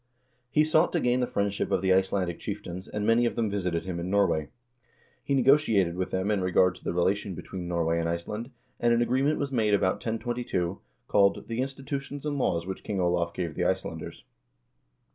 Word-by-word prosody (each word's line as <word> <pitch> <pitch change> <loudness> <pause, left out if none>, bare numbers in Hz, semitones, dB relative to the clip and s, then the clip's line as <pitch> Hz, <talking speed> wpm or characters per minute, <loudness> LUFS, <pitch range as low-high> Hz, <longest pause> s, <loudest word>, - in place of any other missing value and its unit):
He 150 +4 +4
sought 155 +2 +3
to 175 - +2
gain 125 -2 +2
the 125 - +1
friendship 100 0 -1
of 95 -2 0
the 95 -1 +4
Icelandic 95 -2 +1
chieftains, 95 -3 -6
and 105 0 -3
many 120 +2 +4
of - - -3
them 110 -3 0
visited 90 -4 -1
him 90 -2 -3
in 85 +2 -4
Norway. 95 -7 +2 0.7
He 140 - 0
negotiated 120 - +4
with 95 0 -2
them 95 +3 -1
in 100 -2 +1
regard 90 0 +3
to - - -17
the - - -1
relation 95 +2 0
between 90 +1 -6
Norway 85 -1 0
and 85 0 -1
Iceland, 105 +8 -4 0.3
and 120 0 +3
an 120 - +3
agreement 135 +5 +1
was 140 -1 -2
made 110 -5 +3
about 95 -2 +1
1022, 115 -6 -2 0.3
called 100 -1 +3
"The 115 +1 -2
Institutions 135 +1 -5
and 145 -2 -1
Laws 85 -9 0
Which 95 0 -6
King 100 -2 -3
Olav 85 -1 0
Gave 85 -4 -3
the 90 +3 -1
Icelanders." 95 -4 -3
100 Hz, 195 wpm, -28 LUFS, 90-120 Hz, 0.7 s, He